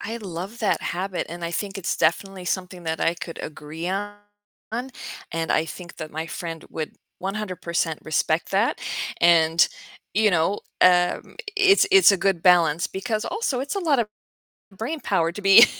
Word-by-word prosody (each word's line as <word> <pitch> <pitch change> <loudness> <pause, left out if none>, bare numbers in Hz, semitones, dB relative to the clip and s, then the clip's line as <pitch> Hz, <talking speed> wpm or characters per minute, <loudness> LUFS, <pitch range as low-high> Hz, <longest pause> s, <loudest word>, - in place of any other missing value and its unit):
I 225 +2 -4
love 195 +2 -6
that 210 - +1
habit, 185 +1 -3
and 170 +1 -6
I 170 - -2
think 200 +3 -3
it's 195 - -2
definitely 185 +3 0
something 180 -1 -3
that 160 0 -2
I 170 - +2
could 170 -1 -7
agree 155 +3 -6
on, 205 +2 -2 1.2
and 165 -1 -2
I 155 - +2
think 175 +2 -9
that 155 - -6
my 160 +2 -4
friend 165 -1 -6
would 155 -1 -4 0.3
100% 185 -5 -2
respect 155 +1 0
that, 200 +5 +1 0.4
and, 165 -1 +5 0.5
you 215 +1 +4
know, 175 +3 +1 0.2
um, 180 -1 +3 0.2
it's 405 0 +5
it's 385 - +8
a - - +2
good 185 -2 0
balance 175 -3 +4
because 215 +3 -3
also 430 - -1
it's 275 +2 -3
a 400 - -1
lot 310 -7 +2
of 230 - +1 0.7
brain 290 +10 -3
power 170 - +1
to 205 - -8
be 195 +4 +9
180 Hz, 165 wpm, -24 LUFS, 165-205 Hz, 1.2 s, be